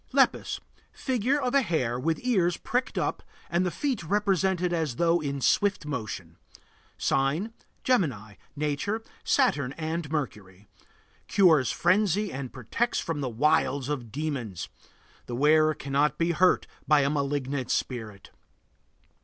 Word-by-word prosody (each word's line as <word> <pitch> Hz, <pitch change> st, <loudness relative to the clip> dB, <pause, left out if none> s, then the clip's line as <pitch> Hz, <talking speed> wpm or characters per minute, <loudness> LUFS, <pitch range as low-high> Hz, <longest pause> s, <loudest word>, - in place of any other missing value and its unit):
LEPUS. -, -, +2 dB, 0.3 s
Figure 260 Hz, +2 st, 0 dB
of 255 Hz, -3 st, -1 dB
a 280 Hz, -, +5 dB
hare 130 Hz, -, -1 dB
with 160 Hz, +5 st, 0 dB
ears 185 Hz, -9 st, +2 dB
pricked 250 Hz, +2 st, -2 dB
up -, -, -1 dB, 0.3 s
and 175 Hz, +2 st, +2 dB
the 180 Hz, -, +1 dB
feet 265 Hz, -, -2 dB
represented 190 Hz, -1 st, +1 dB
as 160 Hz, -7 st, -1 dB
though 170 Hz, +3 st, +3 dB
in 140 Hz, -3 st, -3 dB
swift 195 Hz, +3 st, +2 dB
motion. 110 Hz, -, -5 dB, 0.6 s
Sign: 150 Hz, +12 st, 0 dB, 0.3 s
Gemini. 135 Hz, -, 0 dB, 0.2 s
Nature: 150 Hz, +9 st, -2 dB, 0.2 s
Saturn 140 Hz, -2 st, +2 dB
and 160 Hz, -1 st, -4 dB
Mercury. 105 Hz, -, -4 dB, 0.6 s
Cures 165 Hz, -9 st, +4 dB
frenzy 200 Hz, +2 st, +2 dB
and 130 Hz, -1 st, -5 dB
protects 135 Hz, -, -1 dB
from 160 Hz, -3 st, -3 dB
the 130 Hz, -, -1 dB
wiles 140 Hz, +1 st, +1 dB
of 125 Hz, -7 st, -4 dB
demons. 130 Hz, -, -4 dB, 0.6 s
The 120 Hz, -, -4 dB
wearer 155 Hz, +3 st, +4 dB
cannot 140 Hz, +2 st, 0 dB
be 170 Hz, +1 st, +1 dB
hurt 180 Hz, +2 st, +3 dB, 0.2 s
by 150 Hz, -1 st, +5 dB
a 140 Hz, -, +2 dB
malignant 140 Hz, -2 st, -2 dB
spirit. 110 Hz, -6 st, -3 dB
150 Hz, 130 wpm, -27 LUFS, 135-185 Hz, 0.6 s, a